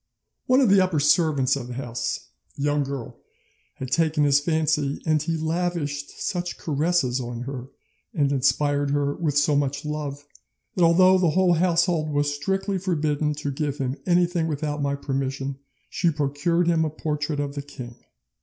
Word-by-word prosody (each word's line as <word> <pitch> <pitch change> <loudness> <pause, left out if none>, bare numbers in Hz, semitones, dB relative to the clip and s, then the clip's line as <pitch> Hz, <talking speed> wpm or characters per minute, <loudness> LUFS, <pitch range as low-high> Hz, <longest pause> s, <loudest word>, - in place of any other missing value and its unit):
One 255 +2 +5
of 250 - +4
the 195 0 +6
upper 180 -5 +1
servants 145 -3 +3
of 130 -3 -5
the 125 - -7
house, 120 -2 -4 0.3
a - - -6
young 145 0 +2
girl, 135 -3 -6 0.6
had 130 -1 -7
taken 155 -1 +2
his 145 -1 +4
fancy, 155 -2 0
and 155 -2 +2
he 165 +2 -1
lavished 160 -3 -2
such 175 -2 -3
caresses 150 -4 0
on 120 -1 -5
her 130 0 -6 0.4
and 145 -9 +1
inspired 145 +1 +1
her 145 0 +1
with 150 -4 -1
so 145 0 +3
much 140 +1 -1
love, 145 -1 -4 0.5
that 180 - +2
although 185 +3 +6
the 175 -3 +3
whole 180 +2 +3
household 170 -2 +2
was 145 0 0
strictly 195 +6 -1
forbidden 155 -4 0
to 145 -1 -3
give 145 0 -2
him 130 -1 -2
anything 175 -1 +2
without 150 -1 -2
my 140 0 0
permission, 135 -1 -3 0.3
she 175 - +1
procured 155 +3 0
him 165 -1 +2
a 155 - 0
portrait 150 -1 -3
of 145 -1 -2
the 140 - -4
king. 125 -4 -9
150 Hz, 170 wpm, -24 LUFS, 140-170 Hz, 0.6 s, the